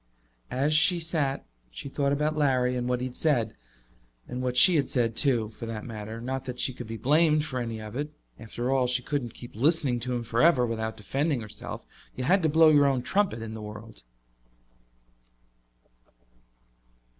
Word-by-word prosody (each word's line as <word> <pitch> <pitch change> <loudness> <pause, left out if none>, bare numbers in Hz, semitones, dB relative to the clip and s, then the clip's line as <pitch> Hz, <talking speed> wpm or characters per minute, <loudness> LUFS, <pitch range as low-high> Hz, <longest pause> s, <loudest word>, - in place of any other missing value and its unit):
As 140 +4 0
she 170 +3 +5
sat 160 -5 -1 0.2
she - - -8
thought 140 0 -1
about 150 +2 0
Larry 130 -4 +1
and 125 0 -2
what 125 0 0
he - - -2
had 130 -1 -7
said. 120 -9 +1 0.7
And 125 - -5
what 125 -1 -2
she 180 +6 +8
had 140 -4 +1
said, 115 -3 0
too, 120 -6 +2
for 115 +1 -9
that 110 -2 -6
matter 110 -1 -7
not 130 +2 -4
that 125 -1 -6
she 130 - +1
could 120 -2 -9
be 115 0 -6
blamed 150 +5 +3
for 130 -4 -4
any 115 -2 -4
of 110 +1 -9
it. 145 +3 -3 0.3
After 120 +3 -4
all, 130 -2 +2
she 125 0 0
couldn't 130 -5 -3
keep 120 - -11
listening 140 0 +2
to 125 +1 -3
him 120 - -3
forever 125 +4 +3
without 110 -1 -4
defending 135 +6 -1
herself; 105 -1 -7 0.3
you 130 - -4
had 185 +9 +3
to 160 - +2
blow 160 +1 +6
your 145 -2 +5
own 130 -3 0
trumpet 190 - 0
in 110 -1 -7
the 110 - -7
world. 105 - -10
125 Hz, 185 wpm, -27 LUFS, 115-145 Hz, 0.7 s, she